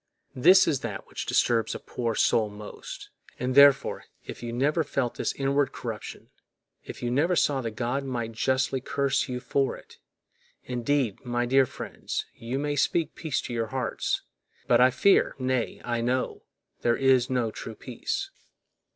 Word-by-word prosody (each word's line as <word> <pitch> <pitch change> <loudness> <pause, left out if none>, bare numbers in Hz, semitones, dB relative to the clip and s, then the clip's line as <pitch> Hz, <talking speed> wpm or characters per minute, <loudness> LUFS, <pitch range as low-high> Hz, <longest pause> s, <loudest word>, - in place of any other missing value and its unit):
This 185 +9 +6
is 145 -5 +1
that 110 -6 -5
which - - -6
disturbs 115 -2 +2
a - - -5
poor 115 -2 -3
soul 110 -2 +3
most. 105 0 -9 0.3
And, 125 +1 -2
therefore, 140 0 +5 0.2
if - - -8
you 120 -1 -4
never 145 +7 +1
felt 135 -4 -1
this - - -1
inward 140 0 0
corruption, - - -7 0.5
if - - -9
you 120 - -1
never 160 +8 +2
saw 140 -4 +2
that 115 -3 -5
God 125 +4 -1
might 120 -4 -3
justly 130 +3 0
curse 140 +1 0
you 125 -1 -3
for 135 +2 0
it, - - -17 0.6
indeed, 125 -2 -1
my 120 -1 -1
dear 135 +1 +4
friends, - - -5
you 120 +3 -4
may 145 +1 -1
speak 155 +2 +1
peace 155 -5 -2
to 120 - -6
your 115 -1 -1
hearts, 130 +2 -2 0.4
but - - +4
I 130 - +7
fear, 160 +10 +3
nay, 130 -2 -1
I 120 -1 -1
know, 125 +2 -1 0.4
there 120 0 +2
is 130 -2 +3
no 125 -4 0
true 110 +1 -8
peace. 390 - -4
130 Hz, 165 wpm, -27 LUFS, 120-140 Hz, 0.6 s, I